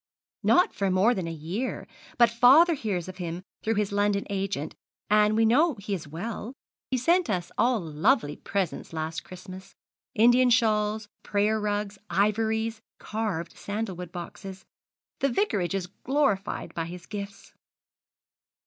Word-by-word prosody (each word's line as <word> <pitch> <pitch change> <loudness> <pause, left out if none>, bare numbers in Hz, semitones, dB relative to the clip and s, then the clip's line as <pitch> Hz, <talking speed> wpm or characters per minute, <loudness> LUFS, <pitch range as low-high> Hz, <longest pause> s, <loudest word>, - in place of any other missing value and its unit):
'Not 360 - +4
for 195 -1 0
more 190 +6 +4
than 185 -6 -3
a - - -3
year, 170 - -4 0.3
but 235 -2 +5
father 265 +9 +6
hears 200 - -2
of 185 -1 -8
him 175 0 -5 0.2
through 225 +1 0
his 205 -1 0
London 205 0 +1
agent, 195 -6 -2 0.4
and 210 0 +5
we 225 - +4
know 290 +7 +4
he 200 0 -5
is 165 -6 -4
well. 215 - -6 0.3
He 260 - +1
sent 340 +5 +2
us 180 -4 -2
all 245 -1 +2
lovely 160 - +1
presents 190 -4 -3
last 160 +1 -3
Christmas 185 +1 -11 0.4
Indian 245 +3 +5
shawls, 215 -2 +2
prayer 210 +2 +1
rugs, 205 -1 -2
ivories, 220 +4 +1 0.2
carved 205 -7 -3
sandalwood 195 -5 -5
boxes. 190 +2 -8 0.5
The 275 - +2
Vicarage 205 - 0
is 190 -2 -1
glorified 245 +1 -1
by 165 - -2
his 175 +1 -9
gifts.' 200 -1 -8
205 Hz, 140 wpm, -27 LUFS, 185-225 Hz, 0.5 s, father